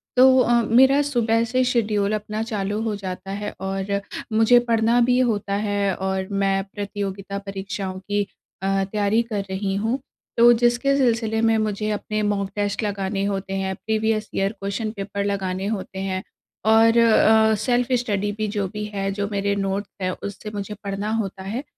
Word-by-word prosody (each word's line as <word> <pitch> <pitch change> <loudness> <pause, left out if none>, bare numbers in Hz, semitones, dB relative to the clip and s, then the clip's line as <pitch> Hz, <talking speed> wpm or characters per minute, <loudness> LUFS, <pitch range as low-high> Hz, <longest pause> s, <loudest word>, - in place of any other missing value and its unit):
तो 260 +1 +7
अ, 240 -1 +3
मेरा 265 +6 +5
सुबह 230 -2 +2
से 255 0 +3
शेड्यूल 215 -4 +1
अपना 215 +1 -3
चालू 210 -1 -2
हो 215 -2 -1
जाता 195 -1 -6
है 205 +1 -4
और 195 +1 -2 0.3
मुझे 225 +2 +6
पढ़ना 230 +1 +3
भी 250 +1 +3
होता 200 -1 -2
है 200 -1 +1
और 190 0 -2
मैं 195 -1 +1
प्रतियोगिता 200 -1 -4
परीक्षाओं 195 -1 -4
की 205 +1 -1 0.4
अ, 195 0 +1
तैयारी 210 +2 +2
कर 200 -2 -1
रही 195 0 -2
हूँ। 225 +6 0 0.4
तो 240 +1 +8
जिसके 245 +3 +3
सिलसिले 225 -4 +1
में 225 -1 +3
मुझे 215 0 -1
अपने 215 +1 -2
मॉक 200 -1 0
टेस्ट 205 +1 -1
लगाने 195 -1 -2
होते 195 -1 -3
हैं, 190 0 -1
प्रीवियस 220 0 -1
ईयर 195 +1 +1
क्वेश्चन 215 +1 -4
पेपर 200 0 -3
लगाने 190 -1 -2
होते 195 -3 -4
हैं 190 -1 -2 0.5
और 225 +1 +5
अ, 220 -1 +5
सेल्फ़ 245 +3 +1
स्टडी 205 -2 -1
भी 215 0 -1
जो 205 -2 -2
भी 210 - -4
है, 195 0 -1
जो 200 0 -2
मेरे 200 0 0
नोट्स 195 0 -2
है, 185 - 0
उससे 200 +1 -7
मुझे 205 +1 -4
पढ़ना 200 +1 -3
होता 190 -1 -6
है। 225 +8 -4
205 Hz, 170 wpm, -23 LUFS, 195-225 Hz, 0.5 s, तो